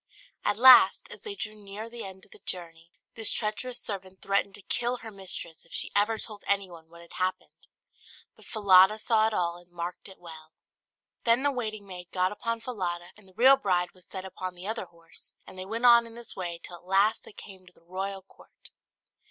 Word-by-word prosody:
At 205 - +1
last, 255 +2 +8
as - - -9
they 420 -2 -6
drew 215 - -5
near 210 +1 -8
the 235 0 -7
end 190 -1 -9
of - - -27
the - - -13
journey, 165 -2 -4 0.2
this 225 -2 +2
treacherous 215 +3 -1
servant 190 -2 -6
threatened 200 0 0
to 205 - -13
kill 245 +4 0
her 225 -2 -10
mistress 185 -4 -7
if 165 - -16
she - - -1
ever 210 +2 +3
told 210 -2 -5
anyone 180 -5 -2
what 170 0 -14
had 170 - -15
happened. 185 0 -3 0.7
But - - -18
Falada 200 -1 +6
saw 220 0 +3
it 220 - -2
all, 170 -1 0
and 175 0 -17
marked 175 +2 -6
it 190 - -13
well. 160 -2 -12 0.7
Then 235 +3 +3
the 285 - +3
waiting 215 -5 -4
maid 180 -2 -9
got 185 0 +1
upon 230 +2 -3
Falada, 180 -7 -4
and 210 -2 -19
the 190 - -20
real 260 +5 +7
bride 180 -5 0
was 185 -1 -18
set 190 -1 -6
upon 185 -1 -6
the 180 +1 -10
other 220 -1 -3
horse, 165 -1 -13
and - - -12
they 185 - -5
went 225 +5 -2
on 235 -1 +7
in 230 - -13
this 235 0 -6
way 175 -3 -4
till 175 - -8
at - - -22
last 195 +4 +3
they - - -13
came 190 -3 -12
to - - -16
the - - -26
royal 190 +2 -5
court. - - -16
195 Hz, 215 wpm, -28 LUFS, 180-220 Hz, 0.7 s, last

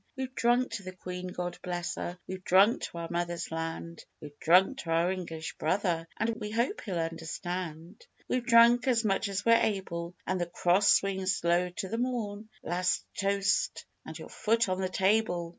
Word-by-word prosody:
We've 260 -1 -4
drunk 240 +1 +2
to 225 -3 -4
the 185 0 -7
Queen 180 0 -6
God 175 -1 -5
bless 175 -1 -3
her! 175 - -5
We've 185 0 -7
drunk 195 +6 +5
to - - -9
our 170 0 -4
mothers' 175 0 -2
land; 165 0 -5 0.2
We've 145 -1 -11
drunk 190 - +4
to 170 - -7
our 165 +2 +2
English 165 -4 -5
brother 170 -1 0
(And 225 +1 0
we 210 - -5
hope 235 - -1
he'll 190 -5 -4
understand). 165 - -5 0.2
We've 250 - 0
drunk 235 +1 +6
as 235 -3 +2
much 195 +1 +1
as 200 +1 -3
we're 230 0 +6
able, 180 -4 -2
And 185 -1 -1
the 175 - -1
Cross 180 +3 +3
swings 190 -1 0
low 175 +1 +2
to 180 +2 -5
the 225 +4 -3
morn; 220 -4 -3
Last 180 +1 0
toast 200 0 0 0.2
and - - -8
your - - -10
foot 230 +1 +1
on 185 0 -1
the 185 - -1
table! 190 -3 +1
185 Hz, 185 wpm, -30 LUFS, 175-215 Hz, 0.2 s, drunk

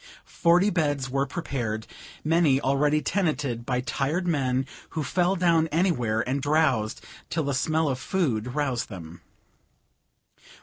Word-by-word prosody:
Forty 180 +4 +3
beds 145 -6 0
were 135 +1 0
prepared, 120 -9 -3 0.4
many 155 -4 +3
already 145 +3 +2
tenanted 150 - -1
by 125 -1 0
tired 145 +7 -1
men 135 -5 +1 0.3
who 155 - 0
fell 180 +6 +1
down 170 -3 +3
anywhere, 125 - +1
and 135 +2 -1
drowsed 140 -7 +1 0.2
till 160 - -1
the 140 0 -1
smell 155 +4 +1
of 130 -2 -1
food 125 - -1
roused 135 -5 -1
them. 85 -4 -9
140 Hz, 130 wpm, -26 LUFS, 125-165 Hz, 0.4 s, Forty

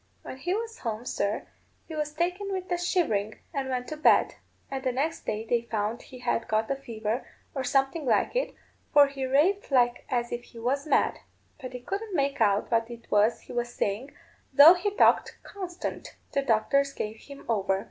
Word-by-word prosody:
When - - -7
he 355 +8 -1
went 455 +1 -4
home, 225 0 -4
sir, 200 -3 -1 0.4
he 320 - -8
was 300 -1 -2
taken 360 +6 -2
with 370 -1 -4
a 355 - +2
shivering, 220 - 0 0.2
and 275 -3 -2
went 250 -1 -2
to 310 - -5
bed; 305 - +4 0.4
and 265 -1 -3
the 255 - +1
next 295 +6 -2
day 215 +1 -2
they 235 0 +2
found 215 +2 -1
he 255 - -12
had 240 -2 -1
got 220 0 +1
the 275 - 0
fever, 230 -3 -4 0.3
or 265 - -2
something 270 +3 +1
like 235 - +2
it, - - -1 0.4
for 290 -1 +8
he 275 -1 -4
raved 330 +10 +2
like 245 -3 +3
as 240 -1 -1
if 240 - -3
he - - -16
was 275 +6 -1
mad. - - +2 0.4
But 255 -1 -7
they 250 - -6
couldn't 395 - -4
make 280 -4 0
out 205 0 +2
what 230 0 +2
it 235 -1 -11
was 210 +3 +3
he - - -11
was 240 0 -2
saying, 210 +7 -1 0.4
though 285 +5 +10
he 365 +3 -1
talked 410 - +3
constant. 370 -3 -6 0.2
The 280 - +1
doctors 275 +3 +2
gave 215 +1 -4
him 280 +4 -12
over. 195 -4 +1
265 Hz, 200 wpm, -28 LUFS, 230-310 Hz, 0.4 s, though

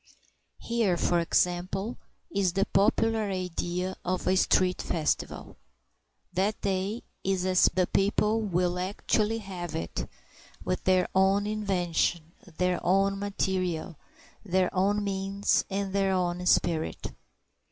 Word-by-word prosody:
Here, 225 -7 0
for 175 0 +2
example, 180 +5 0 0.4
is 195 -3 +1
the 195 +1 +2
popular 220 +1 +2
idea 180 0 -3
of 180 0 -2
a 185 - +4
street 185 -1 +2
festival; 155 -3 -2 0.8
that 195 +4 0
day 195 +3 -1 0.2
is 190 -1 0
as 185 -1 +4
the 185 -1 +2
people 210 +4 +1
will 180 -3 0
actually 210 +3 0
have 185 -5 -6
it, 85 - -4 0.6
with 185 - -2
their 185 -1 +3
own 195 +2 +3
invention, 180 -5 -1 0.3
their 180 -1 0
own 195 +2 +2
material, 185 -4 -2 0.5
their 185 -2 +1
own 200 +2 +1
means, 195 0 0
and 195 -1 -2
their 195 -1 +2
own 180 -1 -1
spirit. 160 -3 +1
190 Hz, 120 wpm, -28 LUFS, 180-200 Hz, 0.8 s, a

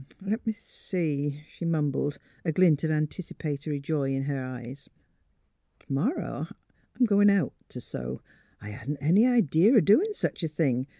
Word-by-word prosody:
*' - - -38
Le' 195 +2 -1
me 220 - +1
see," 150 -9 -3
she - - -10
mumbled, 145 -3 0 0.3
a 165 - 0
glint 160 -3 +4
of 160 - +1
antici 155 +3 -2
patory 145 -1 -3
joy 140 -1 -1
in 135 - -1
her 140 -1 -2
eyes. 130 +2 -8 0.4
" - - -47
T - - -27
' - - -36
morrow 210 - -1 0.5
I'm 250 - +6
goin* 205 -2 +5
out 195 -8 +2 0.2
t' - - -7
sew. 65 +1 -6 0.4
I 105 0 -8
hadn't 135 +8 -5
any 175 - +4
idee 215 - +4
o' 245 -2 +7
doin' 340 - +4
sech - - -2
a 165 - 0
thing. 140 -5 0
155 Hz, 180 wpm, -27 LUFS, 140-195 Hz, 0.5 s, o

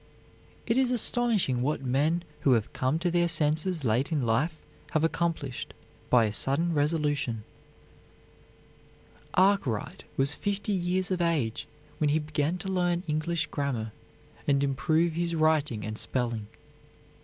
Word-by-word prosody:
It 230 +1 +1
is 265 -1 +3
astonishing 230 - +2
what 140 +1 -1
men 145 +7 +1 0.2
who 140 -3 +3
have 110 -3 0
come 130 +4 0
to 175 +1 -1
their 175 0 +3
senses 155 +1 +2
late 120 +6 +1
in 145 -6 0
life 145 +9 +1 0.4
have 155 -1 +2
accomplished 165 -6 -2 0.3
by 120 -3 +5
a 105 - -2
sudden 155 +10 +2
resolution. 145 -6 0 1.9
Arkwright 185 - +1
was 135 +2 +3
fifty 205 +4 -2
years 185 +1 0
of 180 -1 0
age 150 -10 0 0.3
when 150 - +2
he 150 - +3
began 155 +2 -1
to 190 - -7
learn 175 -2 0
English 155 +1 -1
grammar 125 -6 -2 0.6
and 140 -1 +3
improve 155 +5 +1
his 170 0 0
writing 155 -8 +1
and 110 0 -3
spelling. 120 -4 -2
155 Hz, 135 wpm, -28 LUFS, 135-175 Hz, 1.9 s, by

